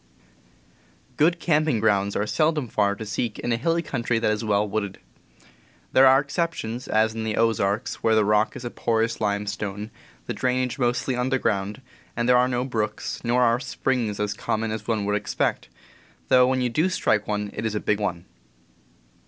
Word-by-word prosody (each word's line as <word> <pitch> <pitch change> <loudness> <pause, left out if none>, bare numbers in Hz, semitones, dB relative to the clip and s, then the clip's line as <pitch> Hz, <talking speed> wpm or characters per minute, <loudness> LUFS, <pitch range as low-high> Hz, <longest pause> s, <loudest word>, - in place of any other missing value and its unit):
/^OOD 170 +3 +4
camping 155 -6 +1
grounds 100 -2 +1
are 105 - 0
seldom 155 +2 +1
far 100 -2 +1
to 110 - -7
seek 110 +1 -3
in 120 - -3
^^ - - +3
a - - +2
hilly 165 +8 0
country 120 -5 -1
that 115 -1 +1
is 110 +2 -2
well 105 -1 +1
wooded. 100 -2 -3 1.0
There 135 0 +7
are 135 +1 +7
exceptions, 140 -5 -3
as 110 +1 +2
in 110 0 -4
the 110 -1 -2
Ozarks, 110 -1 0
where 110 -1 +3
the 110 -1 +3
rock 105 +1 +2
is 120 - -7
a 120 - -4
porous 115 0 -1
limestone, 105 0 -2 0.3
the - - -3
drainage 125 0 -1
mostly 125 +1 0
underground, 125 -4 -1 0.4
and 120 0 0
there 125 - +5
are 125 0 +4
no 125 0 -1
brooks, 110 -4 -3
nor 125 +1 +2
are 115 0 +3
springs 125 -6 -2
as 105 0 -1
common 110 +1 -2
as 110 -1 -5
one 110 -3 0
would 105 0 0
expect, 105 - -1 0.6
though 125 -1 +6
when 130 0 +1
you 125 - +1
do 155 +10 +1
strike 105 - +1
one 105 -1 -2
it 110 - -5
is 110 -1 -2
a - - 0
big 105 0 0
one. 90 -4 -3
115 Hz, 185 wpm, -24 LUFS, 105-125 Hz, 1.0 s, There